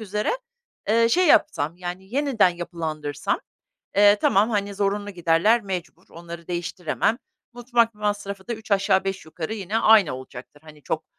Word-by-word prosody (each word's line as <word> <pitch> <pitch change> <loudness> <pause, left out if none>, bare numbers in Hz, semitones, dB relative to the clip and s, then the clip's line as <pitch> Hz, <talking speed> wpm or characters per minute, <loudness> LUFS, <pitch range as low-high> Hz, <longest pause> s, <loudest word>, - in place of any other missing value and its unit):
üzere, 210 0 -2 0.6
eee, 230 +2 +4
şey 365 +9 +3
yapsam, 170 - +3
yani, 185 +4 -7
yeniden 275 -9 +3
yapılandırsam, 165 -4 -4 0.6
eee, 205 0 +7
tamam, 205 +4 +3
hani, 200 -2 -1
zorunlu 205 +1 -1
giderler 180 +6 +2
mecbur, 185 -4 -6
onları 170 0 -10
değiştiremem. 175 +5 -1 0.3
Mutfak 240 -2 +1
masrafı 205 -1 -4
da - - -1
üç 220 0 -14
aşağı 195 -1 +3
beş 195 -3 -3
yukarı 160 +6 -5
yine 210 +2 -2
aynı 215 - +5
olacaktır. 130 +2 -11
Hani 150 -2 -15
çok, - - -3
195 Hz, 145 wpm, -24 LUFS, 170-215 Hz, 0.6 s, eee